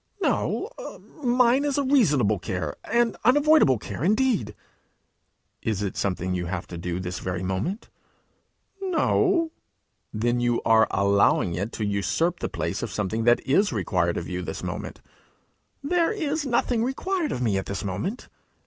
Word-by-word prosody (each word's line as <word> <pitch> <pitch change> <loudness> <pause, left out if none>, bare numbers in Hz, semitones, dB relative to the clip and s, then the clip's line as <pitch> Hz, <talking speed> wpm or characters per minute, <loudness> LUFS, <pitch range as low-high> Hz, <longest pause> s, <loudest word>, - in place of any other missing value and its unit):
'No; 440 - 0 0.5
mine 250 +2 +3
is 290 -1 0
a 285 - +2
reasonable 145 - +3
care 90 -5 -3
an 235 -1 +1
unavoidable 290 - +5
care, 105 +4 -6
indeed!' 205 - +1 1.1
'Is 105 -3 -1
it 100 - -3
something 90 -1 -1
you 90 -1 -2
have 90 0 -4
to 85 - -6
do 90 0 -3
this 90 0 -4
very 90 0 -3
moment?' 95 - -3 0.9
'No.' 365 -2 +2 0.6
'Then 120 +3 0
you 120 -1 +1
are 110 0 +5
allowing 100 -2 +2
it 100 +7 -3
to 110 - -2
usurp 105 - 0
the - - -3
place - - -3
of - - -3
something 110 +2 -2
that 120 0 +4
is 200 +10 +3
required - - 0
of - - -4
you - - -3
this - - -6
moment!' - - -5 0.8
'There 340 +5 +2
is 310 -7 -2
nothing 240 -1 +1
required 320 +6 -1
of 125 - -2
me 100 -5 +1
at 95 - -6
this 100 - -4
moment.' 105 - -4
125 Hz, 155 wpm, -25 LUFS, -, 1.1 s, unavoidable